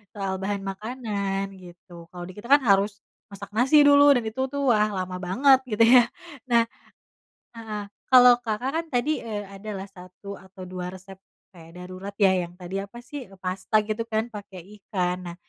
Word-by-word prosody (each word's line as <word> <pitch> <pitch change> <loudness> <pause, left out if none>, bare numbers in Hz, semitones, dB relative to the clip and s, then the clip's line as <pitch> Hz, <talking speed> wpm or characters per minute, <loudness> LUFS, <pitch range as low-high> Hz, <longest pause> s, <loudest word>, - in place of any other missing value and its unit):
soal 195 -1 -3
bahan 200 0 -2
makanan, 200 -2 -3
gitu. 175 -2 -14
Kalau 175 -1 -9
di 185 - -10
kita 210 +5 -11
kan 285 +1 +6
harus 200 0 +2 0.3
masak 200 0 -10
nasi 270 +6 +5
dulu, 285 0 +7
dan 240 - -2
itu 220 +4 -3
tuh, 280 -3 +1
wah, 210 0 +2
lama 185 -2 -4
banget 260 +9 +4
gitu 220 +1 +3
ya. 240 0 +6 0.4
Nah 235 -1 +4 0.9
heeh, 215 -2 -6 0.3
kalau 250 -1 +8
Kakak 230 +3 -2
kan, 330 +1 -1
tadi, 245 +5 +1
eee, 210 -3 -5
ada 195 +2 -10
lah, 195 +1 -7
1 185 +2 -11
atau 190 0 -13
2 180 -1 -5
resep 190 +1 -12 0.4
kayak 165 +1 -13
darurat 185 +2 -8
ya, 190 -2 +4
yang 170 - -14
tadi 180 +1 -7
apa 235 +4 -11
sih, 270 +1 -8
eee, 195 - -16
pasta 185 +3 0
gitu 215 +2 -3
kan, 220 +1 -1
pakai 200 -4 -10 0.2
ikan. 180 -3 -1 0.2
Nah, - - -13
200 Hz, 180 wpm, -25 LUFS, 185-235 Hz, 0.9 s, kalau